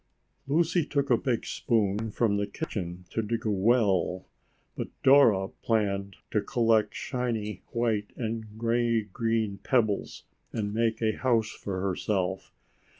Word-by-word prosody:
Lucy 165 Hz, +4 st, +2 dB
took 140 Hz, -2 st, -1 dB
a -, -, +7 dB
big 120 Hz, 0 st, -1 dB
spoon 110 Hz, -1 st, 0 dB
from 105 Hz, -1 st, +1 dB
the 100 Hz, 0 st, -1 dB
kitchen 90 Hz, -, -5 dB
to 115 Hz, -, 0 dB
dig 115 Hz, +1 st, -3 dB
a 110 Hz, -, +2 dB
well, 95 Hz, -4 st, +2 dB, 0.5 s
but -, -, -3 dB, 0.2 s
Dora 115 Hz, -9 st, +6 dB
planned 100 Hz, -3 st, 0 dB, 0.2 s
to 105 Hz, -, +2 dB
collect 115 Hz, -2 st, +2 dB
shiny 115 Hz, -6 st, -3 dB
white 115 Hz, -3 st, -1 dB
and 110 Hz, -2 st, -4 dB
gray 115 Hz, 0 st, +1 dB
green 110 Hz, 0 st, -1 dB
pebbles 110 Hz, -6 st, 0 dB, 0.3 s
and 105 Hz, -2 st, -2 dB
make 115 Hz, 0 st, 0 dB
a 110 Hz, -1 st, +1 dB
house 115 Hz, -4 st, +1 dB
for 95 Hz, -2 st, -5 dB
herself. 95 Hz, 0 st, -1 dB
110 Hz, 135 wpm, -28 LUFS, 100-120 Hz, 0.5 s, a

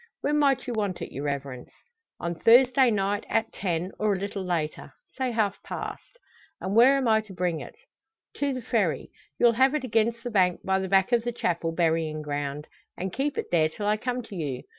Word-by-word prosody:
"When 295 Hz, +1 st, +1 dB
might 275 Hz, -2 st, +2 dB
you 245 Hz, -, -3 dB
want 205 Hz, -5 st, -2 dB
it, -, -, -8 dB
your 140 Hz, +2 st, -5 dB
Reverence?" 140 Hz, -3 st, -4 dB, 0.5 s
"On 170 Hz, 0 st, -2 dB
Thursday 250 Hz, -, +5 dB
night, 205 Hz, -1 st, 0 dB
at 225 Hz, 0 st, 0 dB
ten, 180 Hz, -1 st, -2 dB
or 210 Hz, -1 st, +2 dB
a -, -, -1 dB
little 200 Hz, 0 st, -4 dB
later 160 Hz, -5 st, -3 dB, 0.2 s
say 260 Hz, -1 st, -1 dB
half 220 Hz, -4 st, -1 dB
past." -, -, -7 dB, 0.4 s
"And 190 Hz, +2 st, -3 dB
where 255 Hz, +4 st, +7 dB
am 265 Hz, -3 st, 0 dB
I 220 Hz, -1 st, +4 dB
to 215 Hz, -3 st, -13 dB
bring 175 Hz, -3 st, -1 dB
it?" 125 Hz, -, -10 dB, 0.6 s
"To 285 Hz, -1 st, 0 dB
the 255 Hz, -2 st, -4 dB
Ferry; 215 Hz, -9 st, 0 dB, 0.3 s
you'll 240 Hz, -, +5 dB
have 260 Hz, +5 st, +3 dB
it 300 Hz, -, -1 dB
against 230 Hz, -1 st, 0 dB
the 245 Hz, -, -4 dB
bank 185 Hz, -4 st, +2 dB
by 190 Hz, 0 st, +2 dB
the 190 Hz, -1 st, -3 dB
back 195 Hz, +4 st, +3 dB
of 235 Hz, -2 st, +3 dB
the 240 Hz, -, -1 dB
Chapel 170 Hz, -7 st, -1 dB
burying 160 Hz, -2 st, 0 dB
ground, 145 Hz, 0 st, -4 dB, 0.3 s
and 185 Hz, 0 st, -4 dB
keep 280 Hz, +2 st, -1 dB
it -, -, -4 dB
there 160 Hz, -2 st, +3 dB
till 205 Hz, +6 st, -6 dB
I 210 Hz, +1 st, +3 dB
come 250 Hz, +3 st, -3 dB
to 215 Hz, -, -10 dB
you. 140 Hz, -7 st, -4 dB
200 Hz, 210 wpm, -26 LUFS, 165-240 Hz, 0.6 s, where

